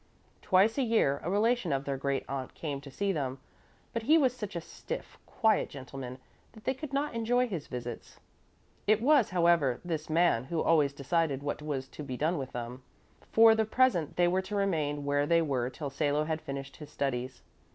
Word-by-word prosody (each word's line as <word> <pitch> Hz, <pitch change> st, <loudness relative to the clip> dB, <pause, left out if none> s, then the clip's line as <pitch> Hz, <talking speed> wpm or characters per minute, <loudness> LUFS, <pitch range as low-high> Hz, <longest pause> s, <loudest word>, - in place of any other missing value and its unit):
Twice 210 Hz, +6 st, +3 dB
a -, -, +3 dB
year 220 Hz, -, +2 dB
a 170 Hz, -, -2 dB
relation 210 Hz, -1 st, +2 dB
of 135 Hz, 0 st, -1 dB
their 140 Hz, -, -1 dB
great 135 Hz, 0 st, -1 dB
aunt 135 Hz, -2 st, -5 dB
came 145 Hz, -4 st, -4 dB
to 140 Hz, -, -10 dB
see 200 Hz, +8 st, -1 dB
them, 135 Hz, -6 st, -2 dB, 0.6 s
but 230 Hz, -, -1 dB
he 300 Hz, +9 st, +5 dB
was 260 Hz, -5 st, +3 dB
such 210 Hz, -6 st, -6 dB
a 170 Hz, -, -2 dB
stiff, -, -, -7 dB
quiet 220 Hz, -3 st, +2 dB
gentleman 130 Hz, -2 st, -8 dB, 0.4 s
that 220 Hz, -2 st, -15 dB
they 260 Hz, -, +1 dB
could 280 Hz, +1 st, -8 dB
not 280 Hz, +1 st, -1 dB
enjoy 245 Hz, +2 st, +1 dB
his 175 Hz, -9 st, -5 dB
visits. 120 Hz, -2 st, -7 dB, 0.7 s
It 215 Hz, +1 st, +5 dB
was, 270 Hz, -1 st, +4 dB
however, 170 Hz, -8 st, +3 dB
this 160 Hz, -3 st, -3 dB
man 155 Hz, -7 st, +3 dB
who 165 Hz, +4 st, -2 dB
always 155 Hz, -4 st, +3 dB
decided 140 Hz, 0 st, -1 dB
what 145 Hz, +1 st, -3 dB
was 140 Hz, -3 st, -3 dB
to -, -, -9 dB
be 130 Hz, -3 st, -5 dB
done 160 Hz, +3 st, 0 dB
with 130 Hz, -1 st, -5 dB
them. 120 Hz, +1 st, -6 dB, 0.5 s
For 225 Hz, 0 st, +7 dB
the 220 Hz, 0 st, +2 dB
present 220 Hz, -, +2 dB
they 175 Hz, 0 st, +4 dB
were 185 Hz, +2 st, +2 dB
to 190 Hz, +2 st, -6 dB
remain 155 Hz, -8 st, 0 dB
where 145 Hz, 0 st, +1 dB
they 165 Hz, 0 st, +4 dB
were 130 Hz, -5 st, -1 dB
till 140 Hz, +1 st, -6 dB
Salo 145 Hz, +1 st, +1 dB
had 155 Hz, 0 st, -2 dB
finished 140 Hz, -2 st, -6 dB
his 150 Hz, -2 st, -10 dB
studies. 130 Hz, -3 st, -3 dB
155 Hz, 200 wpm, -30 LUFS, 140-210 Hz, 0.7 s, For